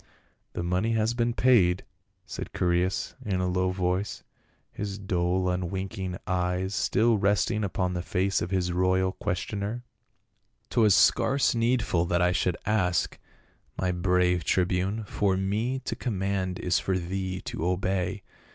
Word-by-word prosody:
" -, -, -44 dB
The -, -, -3 dB
money 90 Hz, +6 st, 0 dB
has 110 Hz, +1 st, +1 dB
been 120 Hz, -1 st, 0 dB
paid," 95 Hz, -9 st, +4 dB, 0.4 s
said -, -, -6 dB
Chaereas 90 Hz, +1 st, 0 dB
in 95 Hz, -3 st, -1 dB
a 90 Hz, -, 0 dB
low 90 Hz, +1 st, +1 dB
voice, 90 Hz, +2 st, -2 dB, 0.5 s
his 100 Hz, -1 st, -5 dB
dull 90 Hz, -2 st, 0 dB
unwinking 95 Hz, +1 st, -3 dB
eyes 90 Hz, +1 st, -1 dB
still 110 Hz, +2 st, +2 dB
resting 105 Hz, +2 st, +1 dB
upon 90 Hz, -2 st, -1 dB
the 90 Hz, -, -2 dB
face 95 Hz, +2 st, 0 dB
of 85 Hz, -, -2 dB
his 90 Hz, -2 st, 0 dB
royal 95 Hz, +1 st, +2 dB
questioner. 105 Hz, +4 st, -3 dB, 0.3 s
" -, -, -48 dB
' -, -, -45 dB
Twas 110 Hz, -4 st, +5 dB
scarce 140 Hz, 0 st, +4 dB
needful 115 Hz, -7 st, +1 dB
that 85 Hz, -, +1 dB
I 90 Hz, 0 st, +3 dB
should 90 Hz, -1 st, 0 dB
ask, 90 Hz, -5 st, +1 dB, 0.6 s
my 90 Hz, -1 st, 0 dB
brave 90 Hz, -1 st, +2 dB
tribune; 95 Hz, +5 st, 0 dB
for 100 Hz, -2 st, 0 dB
me 105 Hz, +7 st, -1 dB
to -, -, -2 dB
command 95 Hz, -5 st, -2 dB
is 90 Hz, -, +1 dB
for 95 Hz, -1 st, -1 dB
thee 95 Hz, +1 st, -3 dB
to -, -, -5 dB
obey. 90 Hz, +2 st, -1 dB
95 Hz, 150 wpm, -27 LUFS, 90-105 Hz, 0.6 s, Twas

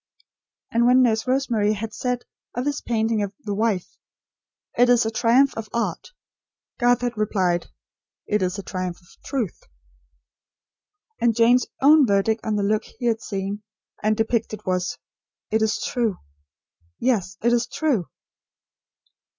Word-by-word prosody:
And 235 Hz, +1 st, +3 dB
when 255 Hz, +1 st, +6 dB
Nurse 225 Hz, -1 st, +1 dB
Rosemary 240 Hz, -5 st, +1 dB
had 215 Hz, +1 st, -5 dB
said 250 Hz, +2 st, -2 dB, 0.3 s
of 245 Hz, +2 st, -2 dB
his 290 Hz, 0 st, -1 dB
painting 225 Hz, -2 st, 0 dB
of 200 Hz, 0 st, -3 dB
"The 205 Hz, -6 st, -3 dB
Wife": 205 Hz, -3 st, -1 dB, 0.8 s
"It 245 Hz, +1 st, +4 dB
is 245 Hz, -2 st, +5 dB
a 220 Hz, -, -1 dB
triumph 245 Hz, +5 st, +4 dB
of 220 Hz, -1 st, -6 dB
art"; 235 Hz, -, -2 dB, 0.7 s
Garth 245 Hz, -1 st, +3 dB
had 245 Hz, -1 st, -2 dB
replied: 185 Hz, -5 st, 0 dB, 0.6 s
"It 210 Hz, -1 st, 0 dB
is 185 Hz, +1 st, -1 dB
a 200 Hz, -, -5 dB
triumph 185 Hz, -2 st, -4 dB
of 175 Hz, -, -23 dB
truth." 245 Hz, -, -3 dB, 1.6 s
And 235 Hz, -2 st, +2 dB
Jane's 235 Hz, +2 st, +4 dB, 0.2 s
own 295 Hz, -1 st, +7 dB
verdict 205 Hz, +2 st, +2 dB
on 215 Hz, -1 st, -1 dB
the 205 Hz, -, 0 dB
look 210 Hz, +1 st, +1 dB
he 245 Hz, -, -8 dB
had 225 Hz, -1 st, +1 dB
seen 200 Hz, +1 st, -4 dB, 0.4 s
and 215 Hz, 0 st, +1 dB
depicted 225 Hz, -1 st, -1 dB
was: 185 Hz, 0 st, -1 dB, 0.5 s
"It 220 Hz, +1 st, +2 dB
is 220 Hz, 0 st, +1 dB
true 230 Hz, -6 st, -1 dB, 0.8 s
yes, 195 Hz, -7 st, 0 dB
it 240 Hz, +1 st, +3 dB
is 240 Hz, 0 st, +1 dB
true!" 265 Hz, -, 0 dB
225 Hz, 145 wpm, -23 LUFS, 205-245 Hz, 1.6 s, own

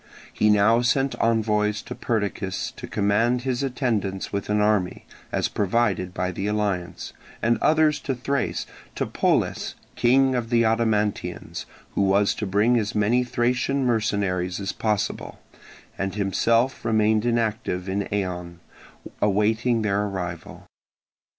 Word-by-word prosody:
He 105 Hz, -, +2 dB
now 105 Hz, +3 st, +4 dB
sent 135 Hz, +2 st, +1 dB
envoys 105 Hz, -2 st, +1 dB
to 120 Hz, -, -7 dB
Perdiccas 100 Hz, -5 st, -2 dB
to -, -, -8 dB
command 115 Hz, +5 st, +1 dB
his 130 Hz, -1 st, -1 dB
attendance 115 Hz, -9 st, -2 dB
with 100 Hz, 0 st, -3 dB
an 105 Hz, 0 st, +2 dB
army, 105 Hz, -3 st, +1 dB, 0.3 s
as -, -, +1 dB
provided 100 Hz, -3 st, 0 dB
by 90 Hz, 0 st, -2 dB
the 95 Hz, +2 st, -3 dB
alliance; 100 Hz, -4 st, -2 dB, 0.3 s
and 115 Hz, 0 st, +1 dB
others 155 Hz, -1 st, +3 dB
to 135 Hz, -, -3 dB
Thrace, 140 Hz, +3 st, -2 dB, 0.3 s
to -, -, -1 dB
Polles, -, -, 0 dB, 0.2 s
king 130 Hz, +2 st, +4 dB
of 120 Hz, -2 st, -2 dB
the 120 Hz, -1 st, +3 dB
Odomantians, 110 Hz, -2 st, -1 dB, 0.3 s
who -, -, 0 dB
was 100 Hz, +1 st, +3 dB
to 105 Hz, -, -4 dB
bring 105 Hz, +5 st, +3 dB
as 105 Hz, -2 st, -3 dB
many 110 Hz, +4 st, +3 dB
Thracian 125 Hz, +2 st, 0 dB
mercenaries 100 Hz, -6 st, 0 dB
as 100 Hz, -1 st, -2 dB
possible; 105 Hz, -2 st, -2 dB, 0.6 s
and 95 Hz, 0 st, -2 dB
himself 115 Hz, +5 st, +1 dB
remained 110 Hz, -1 st, +2 dB
inactive 110 Hz, -5 st, -1 dB
in 100 Hz, +1 st, -1 dB
Eion, 90 Hz, -3 st, -3 dB, 0.7 s
awaiting 110 Hz, +3 st, +2 dB
their 100 Hz, 0 st, +1 dB
arrival. 90 Hz, -4 st, -6 dB
105 Hz, 130 wpm, -24 LUFS, 100-120 Hz, 0.7 s, now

